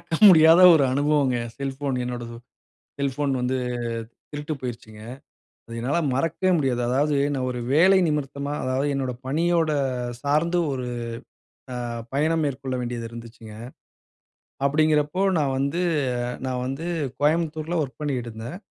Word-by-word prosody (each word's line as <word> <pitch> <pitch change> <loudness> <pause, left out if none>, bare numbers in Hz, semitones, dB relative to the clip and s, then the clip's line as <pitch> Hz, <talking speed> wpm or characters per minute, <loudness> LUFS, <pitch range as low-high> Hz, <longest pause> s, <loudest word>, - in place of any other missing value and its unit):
மறக்க - - -27 0.2
முடியாத 165 0 +7
ஒரு 140 -3 +4
அனுபவங்க! 145 -2 +2
என் 115 - -9
செல்ஃபோன் 135 -1 -2
என்னோடது, 120 -1 -5 0.6
செல்ஃபோன் 140 0 -1
வந்து 130 +1 0 0.7
திருட்டு 150 +1 -4
போயிருச்சுங்க. 115 -4 -7 0.7
அது 115 - -9
என்னால 135 +8 0
மறக்கவே 165 +7 0
முடியாது. 130 -5 0
அதாவது, 145 +4 +1 0.2
நான் 130 -2 -2
ஒரு 125 - -4
வேலையின் 185 +3 +5
நிமித்தமா, 140 -1 -3
அதாவது 130 +2 0
என்னோட 130 -2 -2 0.2
பணியோட 165 +2 +1 0.5
சார்ந்து 160 +5 +1
ஒரு 125 -1 -4 0.9
அ - - -4 0.4
பயணம் 160 +3 +1
மேற்கொள்ள 135 -2 -3
வேண்டியது 120 -1 -4
இருந்துச்சுங்க. 115 -2 -11 1.1
அப்படிங்கிறப்போ, 150 +4 +2 0.2
நான் 140 -3 +1
வந்து 140 +6 -1 0.7
நான் 125 -1 -2
வந்து 135 +5 -4 0.4
கோயம்புத்தூர்ல 160 +2 0
ஒர்க் 135 -2 -7
பண்ணிக்ட்டுருந்தேன். 120 -2 -4
140 Hz, 120 wpm, -24 LUFS, 125-155 Hz, 1.1 s, முடியாத